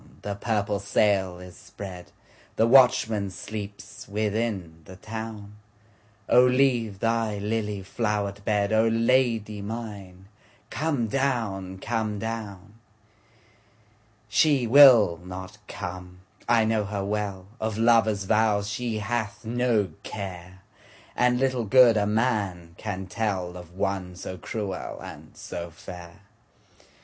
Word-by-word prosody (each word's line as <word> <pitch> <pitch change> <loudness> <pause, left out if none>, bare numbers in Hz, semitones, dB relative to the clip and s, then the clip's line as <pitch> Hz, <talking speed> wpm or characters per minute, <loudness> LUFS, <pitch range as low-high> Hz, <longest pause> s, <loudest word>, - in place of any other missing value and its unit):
the 100 - -3
purple 105 -1 -1
sail 100 -2 +1
is 90 0 -11
spread, 95 -3 -10 0.4
The 110 - +3
watchman 115 -5 +4
sleeps 100 +1 -8
within 105 -5 -2
the 95 - -11
town,O 105 +1 -3
leave 125 -5 +2
thy 115 -1 0
lily 105 -1 -2
flowered 105 -1 -2
bed,O 105 +2 +2
Lady 115 -2 +1
mine 100 -4 -7 0.4
come 150 -7 0
down, 110 -7 -1
come 110 0 -2
down! 105 -1 -6 1.5
She 135 +4 +3
will 115 - +7
not 95 +2 -8
come, 90 0 -7 0.3
I 115 -2 +4
know 110 -1 +1
her 100 -1 -3
well, 100 -2 -3
Of 110 -1 -2
lover's 110 -3 +3
vows 105 0 +2
she 115 +1 -2
hath 110 0 -3
no 115 -4 +1
care, 95 -2 -8 0.5
And 125 0 +2
little 130 -3 0
good 120 +2 +6
a 105 -1 +1
man 105 -7 -1
can 95 -2 -5
tellOf 90 -4 -3
one 90 0 -3
so 90 +1 -6
cruel 100 0 -5
and - - -11
so 85 0 -6
fair. 85 +3 -11
105 Hz, 110 wpm, -26 LUFS, 95-115 Hz, 1.5 s, will